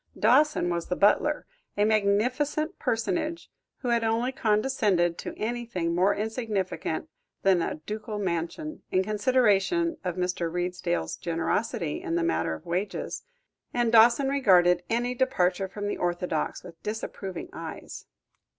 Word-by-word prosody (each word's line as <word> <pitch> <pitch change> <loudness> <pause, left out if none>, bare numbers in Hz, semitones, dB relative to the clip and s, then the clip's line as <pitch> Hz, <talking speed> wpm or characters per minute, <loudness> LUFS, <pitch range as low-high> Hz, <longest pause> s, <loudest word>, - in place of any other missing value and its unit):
Dawson 255 -4 +4
was 170 -1 -2
the 180 - -1
butler, 295 +10 +3 0.3
a 205 - +4
magnificent 240 +9 +1
personage 320 +8 -2 0.3
who 250 - -2
had 235 -1 +2
only 230 +3 +1
condescended 210 -7 +1
to - - -6
anything 220 -7 -2
more 185 +3 +3
insignificant 215 -3 -2 0.4
than 190 -3 +4
a - - -2
ducal 210 +6 -6
mansion, 190 - -3
in 185 - +3
consideration 240 - +2
of 180 -2 -2
Mr. 180 -2 -1
Redesdale's 175 - -2
generosity 170 0 -1
in 165 - -2
the 170 - +1
matter 80 - 0
of - - -13
wages; 180 +4 -3 0.5
and 240 -2 +2
Dawson 235 +4 +6
regarded 180 -10 +4
any 240 +2 0
departure 195 -8 +1
from 205 +2 -5
the - - -2
orthodox, 175 -3 -2
with 170 -2 -12
disapproving 210 - -5
eyes. - - -8
205 Hz, 130 wpm, -27 LUFS, 180-240 Hz, 0.5 s, Dawson